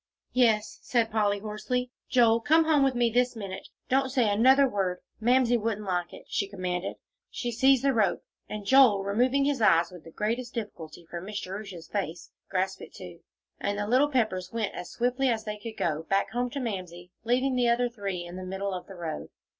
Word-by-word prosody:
"Yes," 225 -4 +2
said 230 -3 +1
Polly, 205 -2 +2
hoarsely. 220 +4 -3 0.2
"Joel, 230 -2 +5
come 320 +6 +4
home 305 -3 +4
with 270 -2 +2
me 240 -1 +2
this 245 +1 +2
minute; 195 -4 -6 0.2
don't 270 +1 +2
say 250 -3 +2
another 265 +6 +5
word, 195 -6 -1 0.2
Mamsie 245 +1 +3
wouldn't 210 -1 -2
like 180 -2 -1
it," - - -12
she 200 - -1
commanded. 185 -2 -3 0.3
She 240 - -3
seized 265 +2 +4
the 275 -1 +3
rope, 210 -6 +1 0.3
and 210 -1 -5
Joel, 235 -5 +6
removing 250 +7 +2
his 280 -4 0
eyes 170 -5 +4
with 180 -3 -12
the - - -12
greatest 230 +7 -3
difficulty 175 -7 -7
from 170 +2 -7
Miss 205 0 -4
Jerusha's 190 -3 -7
face, 180 -5 -4 0.2
grasped 190 0 -1
it, - - -11
too, - - -10 0.4
and 200 0 -1
the 205 - -1
little 255 +7 +3
Peppers 215 -9 0
went 225 -3 -2
as 175 - -7
swiftly 250 +2 0
as 225 -2 0
they 210 -1 -5
could 220 +1 -8
go, 155 -2 0
back 195 0 +1
home 245 +2 -1
to 280 - -5
Mamsie, 180 -7 -5
leaving 255 +3 +1
the 245 -1 +3
other 245 +1 +2
three 200 -6 -4
in 175 +1 -8
the 185 - -6
middle 190 +1 -3
of 180 - -6
the 195 - -10
road. 165 -3 -5
215 Hz, 200 wpm, -28 LUFS, 190-250 Hz, 0.4 s, Joel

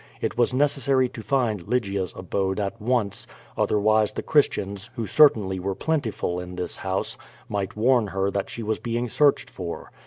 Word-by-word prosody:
It - - -2
was 120 +1 +2
necessary 135 -1 +2
to 115 - -8
find 110 -7 0
Lygia's 100 -6 -1
abode 95 +1 -1
at 100 +3 -3
once, 110 -4 0 0.3
otherwise 105 0 +2
the - - -4
Chris 145 -2 +4
tians, 100 +2 -6
who 115 -3 -2
certainly 105 -6 +4
were 95 +1 -2
plentiful 115 - -1
in 90 0 -7
this 90 0 -2
house, 95 0 -3 0.3
might 100 -2 -3
warn 120 0 +3
her 95 +1 -1
that 100 -1 -2
she 115 - -6
was 110 0 -1
being 120 +1 -2
searched 135 +1 +3
for. 90 -8 -7
105 Hz, 175 wpm, -25 LUFS, 95-125 Hz, 0.3 s, Chris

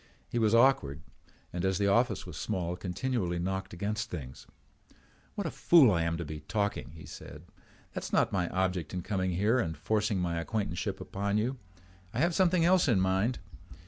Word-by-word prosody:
He 120 - -1
was 110 0 +3
awkward 80 - +3 0.5
and, 90 0 -3
as 95 -1 +1
the 100 - +1
office 110 +2 +2
was - - -8
small, 90 -1 -2
continually 90 0 -2
knocked 95 +2 -3
against 105 +5 -3
things. 65 -7 -8 0.9
"What 205 - -3
a 165 - -2
fool 155 -10 +6
I 85 -3 +1
am 85 0 0
to 85 - -4
be 75 0 -6
talking," 100 +1 -2
he 80 - -11
said. - - -10 0.5
"That - - -4
is - - -6
not - - +3
my 90 -3 0
object 90 -3 -1
in 90 - -3
coming 95 -2 -1
here 105 +8 +2
and 80 - -2
forcing 105 +5 0
my 85 -2 -1
acquaintanceship 100 -2 -2
upon 100 +1 -2
you. 125 +4 -1 0.6
I - - 0
have 170 +4 +3
something 180 -1 +3
else 180 -1 +4
in 115 -7 +4
mind. 95 +6 +1
100 Hz, 185 wpm, -30 LUFS, 90-115 Hz, 0.9 s, fool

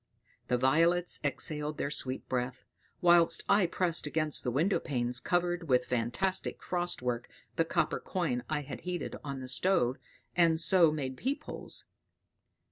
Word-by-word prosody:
The 125 - +1
violets 165 +7 +3
exhaled 150 +1 -1
their 140 - -2
sweet 130 -3 -3
breath, 125 0 -3 0.4
whilst 170 -1 +5
I 200 -3 +4
pressed 170 -3 +1
against 155 0 0
the 125 - -1
windowpanes 125 - 0
covered 175 +2 -1
with 125 -1 +3
fantastic 125 +11 -1
frost 175 -6 -1
work 120 -1 -2 0.3
the 165 - +2
copper - - 0
coin 140 -10 -2
I 155 -1 -1
had 145 -1 -8
heated 180 -1 -4
on 140 -2 -5
the 130 - -7
stove, 130 -1 +2 0.4
and 165 -2 +4
so 170 -2 +6
made 135 -4 -4
peep 280 +4 -2
holes. - - -5
155 Hz, 145 wpm, -31 LUFS, 130-175 Hz, 0.4 s, so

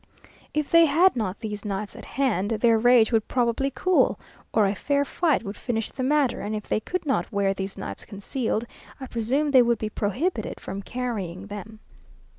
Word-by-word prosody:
If 300 -1 -2
they 335 -1 +7
had 335 +5 +4
not 210 -4 -3
these 210 -2 -5
knives 200 -1 -4
at - - -10
hand, 215 -8 0
their 225 0 +3
rage 240 -1 +5
would 225 -2 +1
probably 245 +2 +1
cool, 370 +6 +2 0.3
or 215 - +3
a 195 - +1
fair 285 +7 0
fight 310 -2 +1
would 200 0 -6
finish 225 -2 -3
the - - -6
matter, 275 -1 +2
and 215 +1 -3
if 210 - -4
they - - +1
could 365 - -4
not 270 -4 0
wear 200 -2 +1
these 195 0 -5
knives 195 - -6
concealed, 225 +3 -3 0.3
I 265 - -6
presume 260 +5 0
they 260 -2 +7
would 235 -1 +2
be 215 - -3
prohibited 225 - -2
from 195 +1 -6
carrying 200 -6 -4
them. 205 +2 -9
230 Hz, 190 wpm, -25 LUFS, 205-270 Hz, 0.3 s, they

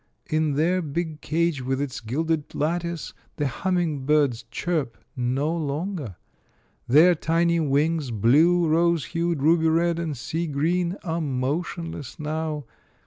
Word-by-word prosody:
In 155 -1 +1
their 170 +6 +2
big 160 0 -4
cage 165 -3 0
with 130 +1 -1
its 140 -3 -3
gilded 150 +6 -2
lattice, 170 +1 -2 0.2
the 150 - -1
humming 165 0 -1
birds 140 -6 +2
chirp 155 -5 -2 0.2
no 135 +6 0
longer. 155 - -3 0.7
Their 155 +8 +7
tiny 170 +1 +1
wings, 150 0 +1
blue, 155 - +4
rose 170 0 +2
hued, 170 -4 -1
ruby 160 +1 +4
red, 170 +1 +2
and 160 -5 -3
sea 165 +7 -3
green, 170 +5 0
are 165 -2 -2
motionless 145 +1 -3
now. 155 -1 -3
160 Hz, 130 wpm, -25 LUFS, 140-170 Hz, 0.7 s, Their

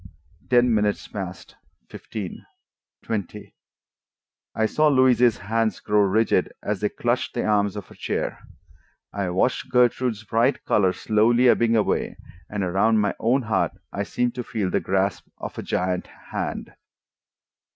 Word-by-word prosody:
Ten 125 -1 +4
minutes 105 -1 0
passed, 95 -4 -7 0.3
fifteen, 105 -5 -7 0.6
twenty. 105 -5 -5 1.0
I 110 - +2
saw 155 +7 +2
Louise's 130 -4 +4
hands 110 +2 -1
grow 105 0 +1
rigid 105 +3 +2
as - - -2
they - - +1
clutched - - -1
the - - -1
arms 105 -1 +1
of 105 -3 -6
her - - -16
chair. - - -3 0.7
I 100 -2 -2
watched 95 +8 0
Gertrude's 125 -2 +2
bright 115 +5 +1
color 95 -3 +3
slowly 115 +5 +3
ebbing 115 -1 +3
away, 110 - 0 0.3
and 105 -1 -2
around 100 +5 +2
my 105 -1 +1
own 125 +4 +2
heart 105 -4 0 0.2
I 100 - -2
seemed 120 +4 -1
to 125 - -4
feel 105 -6 -2
the - - +2
grasp 95 +1 -1
of - - -7
a - - -2
giant 90 0 -1 0.2
hand. - - -4
110 Hz, 140 wpm, -24 LUFS, 100-120 Hz, 1.0 s, Ten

